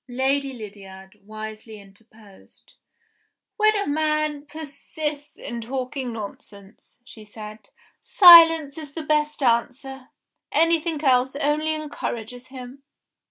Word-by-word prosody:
Lady 270 +2 -1
Lydiard 195 -4 -12
wisely 215 0 -9
interposed. 205 0 -20 0.8
"When 430 0 +3
a 405 - -1
man 305 -1 -1
persists 300 +1 -7
in 240 - -7
talking 255 +1 -5
nonsense," 200 -1 -11
she 220 -3 -13
said, 215 0 -12 0.3
"silence 330 -5 +7
is 295 -3 -10
the 320 - -6
best 300 -1 -1
answer; 260 +3 -1 0.4
anything 330 -1 +1
else 260 -1 +2
only 305 +2 0
encourages 250 -5 -6
him." 260 +1 -11
270 Hz, 105 wpm, -23 LUFS, 225-305 Hz, 0.8 s, silence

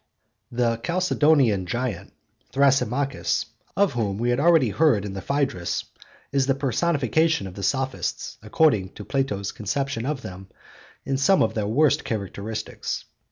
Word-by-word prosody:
The 115 -1 +1
'Chalcedonian 150 - +2
giant,' 120 -3 -3 0.4
Thrasymachus, 135 0 +1 0.3
of 200 -6 +3
whom 105 -5 -1
we 120 +2 +1
have 120 - +1
already 160 -5 +5
heard 115 -4 +2
in 100 - -5
the 95 - -5
Phaedrus, 135 -10 -1 0.5
is 135 -1 +1
the 135 - +3
personification 150 - +1
of 95 - -7
the 100 - -8
Sophists, 130 +5 -2
according 105 -4 +2
to 105 - -9
Plato's 105 -8 -1
conception 125 +3 -2
of 145 -3 -3
them, 95 -2 -8 0.6
in 135 - 0
some 190 +7 +4
of 110 - 0
their 105 -2 -1
worst 140 +6 +3
characteristics. 105 0 -4
125 Hz, 140 wpm, -24 LUFS, 105-140 Hz, 0.6 s, already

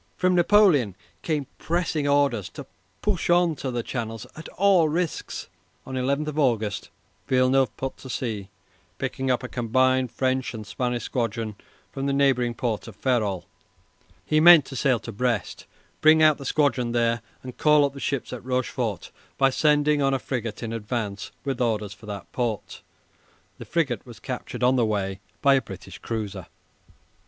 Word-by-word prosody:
From 185 0 +2
Napoleon 175 - +4 0.3
came 150 -4 -1
pressing 160 -3 -1
orders 140 -8 +2
to - - -7 0.4
push 200 -6 0
on 175 -2 +4
to 135 - -3
the 120 -2 -2
Channel 115 -2 -4 0.2
at 160 - -9
all 185 -5 +4
risks. 170 +1 -3 0.4
On 130 - -6
11 140 +4 0
August 110 -8 0 0.4
Villeneuve 130 -2 +2
put 135 0 -4
to 130 - -11
sea, 110 -7 -3 0.5
picking 130 0 -3
up 125 0 +1
a - - -3
combined 130 +1 +1
French 130 -1 -1
and 110 -1 -7
Spanish 125 +2 -2
squadron 115 -2 -2 0.4
from 135 -1 -3
the 140 - +1
neighbouring 130 -4 +2
port 115 -2 -2
of 110 - -10
Ferrol. 105 -7 0 0.8
He 155 - +2
meant 170 -1 +9
to 135 - -9
sail 130 -1 +2
to 115 - -7
Brest, 115 -1 -2 0.3
bring 155 0 +6
out 155 -1 +5
the 140 - -8
squadron 130 -4 +1
there, 115 -1 +1 0.2
and 125 -1 -9
call 150 -1 +5
up 140 - -3
the 140 - -9
ships 135 -2 -2
at 125 - -7
Rochefort 125 -6 -2 0.3
by 135 0 +4
sending 150 +1 +3
on 135 -1 +2
a - - +2
frigate 115 -4 -4
in 115 0 -4
advance 105 -2 -3 0.2
with 135 -3 -2
orders 105 -4 0
for 105 0 -15
that 100 -2 -7
port. 120 -4 -3 0.8
(The - - -8
frigate 140 -10 -1
was 120 -5 -12
captured 125 +1 -5
on 130 +1 +4
the 120 - +3
way 100 -3 -2 0.2
by 140 -1 +6
a 135 - +3
British 95 -3 -10
cruiser.) 105 -5 -5
130 Hz, 165 wpm, -25 LUFS, 115-145 Hz, 0.8 s, meant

